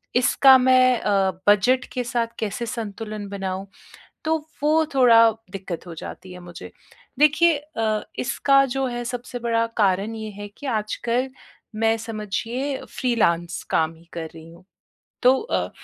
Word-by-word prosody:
इसका 260 +2 +6
मैं 255 -1 +4
अ, 195 -2 +1 0.2
बजट 245 +6 +4
के 250 - -1
साथ 235 -1 -2
कैसे 220 +2 -3
संतुलन 215 -2 -5
बनाऊँ? 195 -1 -4 0.6
तो 320 +1 +2 0.3
वो 315 +2 +3
थोड़ा 230 -4 +6 0.2
दिक्कत 190 -4 -6
हो 170 - -7
जाती 185 +3 -9
है 180 - -10
मुझे। 175 -1 -10 0.5
देखिए 315 +3 +5
अ, 225 -8 -2 0.2
इसका 275 +1 +3
जो 270 +1 -2
है 240 -1 -4
सबसे 245 0 -5
बड़ा 230 -1 +1
कारण 200 +1 +1
ये 220 -1 -6
है 205 0 -8
कि - - -10
आजकल 235 +3 -1 0.5
मैं 225 +1 +2
समझिए 225 +5 -3
फ्रीलांस 175 -9 0
काम 160 0 +1
ही 165 - -19
कर 165 -1 -4
रही 160 0 -12
हूँ। 170 +2 -16 0.6
तो 250 - +7
अ 460 - -2
230 Hz, 150 wpm, -23 LUFS, 200-255 Hz, 0.6 s, तो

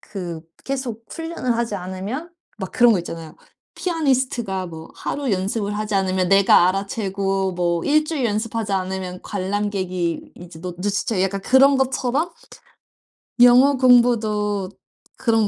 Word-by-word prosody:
그 175 -5 -6 0.2
계속 260 -5 -4
훈련을 325 -8 -3
하지 230 -3 -1
않으면 195 - -5 0.3
막 190 -2 -6
그런 240 -2 +5
거 195 - +2
있잖아요. 165 -2 -8 0.4
피아니스트가 260 - -1
뭐 160 -1 -9
하루 285 -3 -3
연습을 200 +2 -1
하지 210 0 -3
않으면 185 -2 +1
내가 195 -2 +6
알아채고 195 -1 -1
뭐 175 -1 0
1 305 +1 +3
주일 305 -5 -2
연습하지 215 0 -2
않으면 185 -1 -3
관람객이 190 -3 -2
이제 175 -2 -12
노 180 0 -5
눈치 200 +2 -2
채 200 -5 0
약간 195 +1 -1
그런 270 +4 +5
것처럼 265 +5 0 1.1
영어 250 +3 +7
공부도 215 -6 +3 0.5
그런 225 -3 +2
205 Hz, 295 characters per minute, -21 LUFS, 185-245 Hz, 1.1 s, 영어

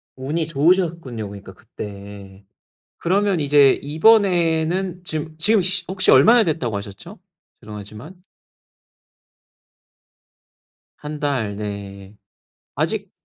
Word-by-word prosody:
운이 150 +5 -3
좋으셨군요, 165 - 0
그러니까 100 -1 -11
그때. 100 -2 -11 0.5
그러면 195 0 0
이제 145 -1 +5
이번에는 175 0 +2
지금 155 -1 -6
지금 210 +4 +3
시 185 +2 +2
혹시 190 0 +2
얼마나 235 +1 +6
됐다고 135 - -2
하셨죠? 100 - -9 0.4
죄송하지만. 105 - -10 2.8
1 150 0 -8
달 130 -9 -2
네. 100 -1 -8 0.6
아직 - - -2
150 Hz, 215 characters per minute, -20 LUFS, -, 2.8 s, 얼마나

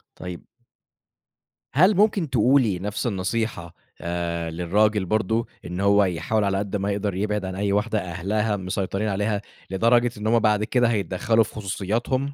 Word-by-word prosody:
طيب 90 -1 -8 1.3
هل 185 - +4
ممكن 200 -5 +2
تقولي 125 -5 +3
نَفْس 105 +5 -3
النصيحة 95 -3 -2 0.3
آآ 85 -1 -3
للراجل 100 +5 +1
برضه 110 +3 0 0.2
إن 90 +1 -5
هو 100 +1 +4
يحاول 95 +4 0
على 100 -1 +1
قد 100 0 -3
ما 100 0 -1
يقدر 100 -1 -2
يبعِد 105 0 -1
عن 95 0 -5
أي 100 +1 -1
واحدة 105 +1 +1
أهلها 100 +5 -1
مسيطرين 95 +2 -2
عليها 105 +1 -1 0.3
لدرجة 120 +5 +3
إن 105 - -3
هم 115 +1 +4
بعد 105 -1 +2
كده 120 +2 +2
هيتدخَّلوا 110 +1 +1
في - - -12
خصوصياتهم؟ 110 +7 -2
105 Hz, 150 wpm, -24 LUFS, 95-110 Hz, 1.3 s, هل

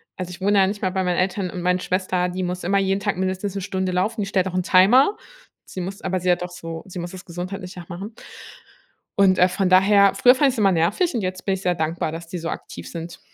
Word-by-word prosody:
Also 185 -1 -5
ich 180 -1 -9
wohne 200 +1 +3
ja 190 - +5
nicht 205 +1 -4
mehr 185 -3 0
bei 190 0 -1
meinen 180 -1 0
Eltern 185 0 0
und 180 - -6
meine 180 +1 +1
Schwester, 185 -1 -1
die 185 +1 -4
muss 180 0 -3
immer 195 +3 +1
jeden 195 0 0
Tag 205 -3 -1
mindestens 190 +1 -2
'ne 195 - -3
Stunde 190 0 -2
laufen, 210 +5 -1
die 200 - -2
stellt 190 -1 +1
auch 185 - -5
'n 185 - +1
Timer, 230 - +5 0.5
sie 185 - -7
muss 195 +2 -6
aber 185 -1 -1
sie 180 0 +2
hat 180 - 0
auch 180 - -6
so 165 -2 -7
sie 185 -1 -7
muss 175 0 -5
das 185 -1 -10
gesundheitlich 180 +2 -7
auch 175 - -12
machen. 195 +5 -7 1.0
Und, 190 -2 +5
äh, 180 - +5
von 185 +1 -1
daher, 200 +2 +5
früher 250 - +6
fand 275 +1 +3
ich's 255 - -4
immer 200 -3 +4
nervig 175 - +1
und 235 - -1
jetzt 185 -1 -4
bin 195 - +1
ich 190 - -4
sehr 180 -2 +1
dankbar, 160 0 -2
dass 165 +1 -7
die 180 +1 -5
so 165 0 -4
aktiv - - -7
sind. 170 0 -7
185 Hz, 265 wpm, -22 LUFS, 180-195 Hz, 1.0 s, früher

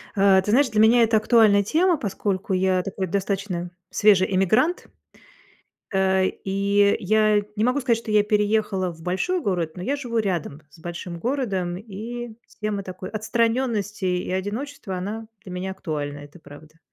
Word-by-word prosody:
А, 195 -1 +5
ты 205 - -2
знаешь, 265 +3 +4
для 215 0 +2
меня 230 +2 +6
это 225 0 +3
актуальная 215 -2 +4
тема, 335 - +2
поскольку 195 -3 -2
я 185 0 +2
такой 190 0 -4
достаточно 190 -2 -2 0.2
свежий 195 -2 +3
эммигрант. 215 - +2 1.1
Э, 190 0 +2
и 200 +1 +1
я 215 +1 +3
не 210 - +1
могу 255 +4 +2
сказать, 240 -3 +1
что 230 -1 -7
я 210 -1 +5
переехала 210 -3 +1
в 165 - -15
большой 190 - -1
город, 175 - -1
но 180 - -6
я 275 +9 -1
живу 245 -5 -3
рядом 175 -8 -2
с 165 - -19
большим 170 +1 -6
городом. 195 -7 -2
И 225 +3 -7 0.3
тема 210 -1 -2
такой 185 0 -8
отстраненности 225 -1 -1
и 180 -1 -1
одиночества- 205 +3 -4
она 210 +5 -5 0.2
для 185 - -9
меня 180 +1 -4
актуальна, 145 -5 -4
это 145 +4 -13
правда. 155 +2 -15
200 Hz, 160 wpm, -23 LUFS, 185-220 Hz, 1.1 s, меня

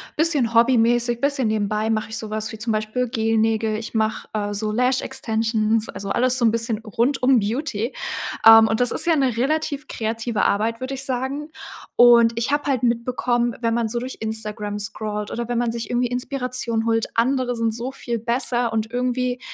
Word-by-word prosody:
bisschen 295 -8 +1
hobbymäßig, 235 0 +3
bisschen 280 -4 +1
nebenbei, 215 +1 -1
mache 215 0 -1
ich 220 - -4
so 220 -2 -6
was 215 0 -3
wie 220 - -8
zum 225 +1 -2
Beispiel 215 +4 -1
Gel-Nägel. 225 -1 0
Ich 220 0 -7
mache 220 -1 -1
äh, 205 -1 -2
so 210 +1 -2
Lash-Extensions, 225 -3 0
also 195 0 -6
alles 255 +4 +2
so 240 - +2
'n 225 - +5
bisschen 230 -1 -1
rund 240 +5 -1
um 255 -1 +5
Beauty. 230 +2 -2 0.5
Ähm, 225 0 +9
und 220 - 0
das 245 -1 +3
ist - - -1
ja 335 -1 +3
'ne 265 -6 +1
relativ 295 +2 -1
kreative 225 0 -2
Arbeit, 225 +3 +1
würde 260 +1 -4
ich 270 +1 -3
sagen. 265 +4 -3 0.5
Und 235 -1 +6
ich 235 +4 -1
habe 290 0 +1
halt 255 -2 0
mitbekommen, 240 0 0
wenn 230 -1 +1
man 230 -1 0
so 240 +2 -2
durch 255 +2 -6
Instagram 215 -1 -4
scrollt 210 0 -4
oder 235 -1 -4
wenn 240 0 -2
man 235 -1 0
sich 230 -2 -5
irgendwie 245 0 +1
Inspiration 245 -2 -2
holt, 225 -1 +1
andere 250 +1 +1
sind 230 -1 0
so 235 +3 -5
viel 240 -3 -4
besser 240 +1 0
und 220 0 -2
irgendwie, 250 0 -1
235 Hz, 190 wpm, -22 LUFS, 220-250 Hz, 0.5 s, Ähm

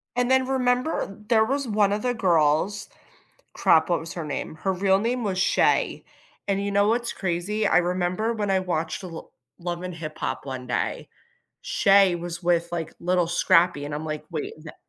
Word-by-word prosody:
And 245 0 +1
then 260 0 +4
remember, 250 -4 0
there 220 -2 +4
was 275 +1 -1
one 205 -2 +2
of 210 - -2
the 250 -1 0
girls 180 0 +1 0.7
crap, 160 0 +4
what 170 - +1
was 165 +1 -8
her 165 -3 -5
name? 150 +1 -4
Her 190 +4 -1
real 190 +1 +2
name 235 +2 -1
was 190 -2 -1
Shay, - - +2 0.4
and 200 0 0
you 200 - -2
know 200 +1 +3
what's 235 +1 0
crazy, 195 +4 -2
I - - +4
remember 180 +5 0
when 205 -2 -2
I 190 -1 +3
watched 170 -3 -2
the 185 - -7
Lo 165 -1 -9 0.3
Love 175 0 -4
and 180 -1 -5
Hip 155 -2 -7
Hop - - -3
one 130 -2 -6
day, 125 - -2 0.5
Shay 195 -3 +4
was 175 0 -6
with, 170 -1 +1
like, 165 -2 -4
Lil 180 -1 +1
Scrappy, 175 -3 +3
and 145 - -5
I'm 150 +2 -4
like, 155 -1 -4
wait 155 -3 -4
the 155 - -10
185 Hz, 195 wpm, -25 LUFS, 170-210 Hz, 0.7 s, then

